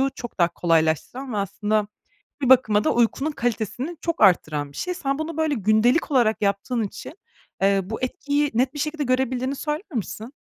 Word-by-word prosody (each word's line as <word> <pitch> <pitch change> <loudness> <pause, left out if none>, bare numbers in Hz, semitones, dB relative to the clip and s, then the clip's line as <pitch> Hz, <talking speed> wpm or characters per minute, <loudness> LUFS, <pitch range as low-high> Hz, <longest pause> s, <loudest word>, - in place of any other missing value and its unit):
çok 240 -5 -8
daha 170 - +5
kolaylaştıran 170 - 0
ve 210 - -2
aslında 210 +1 -1 0.5
bir 260 - +1
bakıma 215 -5 +5
da - - +2
uykunun 240 +6 +1
kalitesini 245 - -3
çok 335 -1 -2
arttıran 155 -7 +3
bir - - -13
şey. 360 0 -2
Sen 275 -4 -2
bunu, 315 0 -4
böyle, 315 -2 +1
gündelik 220 - +2
olarak 230 -5 +2
yaptığın 200 +4 0
için, 205 +7 -7 0.5
eee, 195 0 +3
bu 215 +4 -6
etkiyi 285 +3 -1
net 255 +4 +1
bir 295 - -7
şekilde 305 0 -2
görebildiğini 255 +1 0
söyler 300 +7 -3
misin? 225 +3 -5
245 Hz, 170 wpm, -23 LUFS, 210-285 Hz, 0.5 s, daha